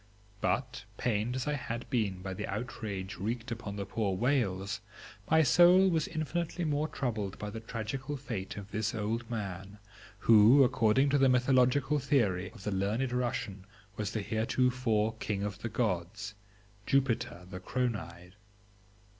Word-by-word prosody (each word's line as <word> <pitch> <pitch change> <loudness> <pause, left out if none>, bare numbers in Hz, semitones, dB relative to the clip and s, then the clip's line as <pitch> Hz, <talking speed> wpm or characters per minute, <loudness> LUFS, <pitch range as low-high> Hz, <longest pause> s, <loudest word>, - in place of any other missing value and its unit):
But 125 -3 -1
pained 115 +1 0
as 130 - -2
I 150 - 0
had 120 -4 -4
been 100 -7 0
by 95 -1 -4
the - - -4
outrage 105 -3 -5
wreaked 115 +5 -3
upon 110 -3 -5
the 100 -1 -4
poor 100 -1 -1
whales, 105 -4 0 0.5
my 160 0 +5
soul 175 +6 +6
was 160 -3 +1
infinitely 170 +2 -2
more 150 0 0
troubled 110 -9 -3
by 105 0 -5
the 110 - -6
tragical 120 +6 -4
fate 115 -9 -5
of 100 0 -8
this 110 +1 -1
old 110 +2 -2
man 100 -3 -5 0.4
who, 115 +5 +7
according 130 +1 +3
to 145 - +3
the 135 -1 +5
mythological 130 +3 +3
theory 105 -10 +1
of 110 -3 -14
the 105 - -2
learned 105 +7 0
Russian, 120 -6 -2 0.3
was 105 -1 -3
the 110 -2 -2
heretofore 115 0 +1
King 100 -2 -2
of 100 -1 -4
the 115 - -4
gods, 105 -1 -2 0.5
Jupiter 130 -9 0
the 90 0 -7
Chronide. 90 -6 -3
115 Hz, 150 wpm, -31 LUFS, 100-130 Hz, 0.5 s, who